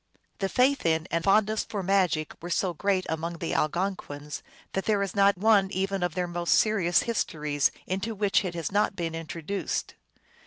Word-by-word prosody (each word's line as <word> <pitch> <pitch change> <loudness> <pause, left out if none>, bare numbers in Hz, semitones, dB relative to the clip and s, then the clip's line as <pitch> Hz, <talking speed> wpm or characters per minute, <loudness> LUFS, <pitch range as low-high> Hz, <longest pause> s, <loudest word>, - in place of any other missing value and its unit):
The 195 -2 0
faith 265 +4 +2
in 160 -1 +1
and 165 0 0
fondness 215 +2 +3
for 200 -3 -4
magic 180 -5 +1
were 175 - -6
so 180 +1 0
great 190 +2 0
among 165 +1 -3
the 165 - -3
Algonquins 150 -4 -2 0.3
that 195 - -2
there 205 -2 +2
is 195 - -4
not 200 -1 +4
one 200 -1 +4
even 195 +1 -1
of 175 -2 -1
their 180 -1 -1
most 175 0 +1
serious 200 -6 +3
histories 150 - 0 0.2
into 195 +4 -3
which 205 0 +2
it 180 -2 -4
has 165 -4 -3
not 205 0 +1
been 165 -3 -3
introduced. 165 +3 -4
185 Hz, 180 wpm, -27 LUFS, 165-200 Hz, 0.3 s, not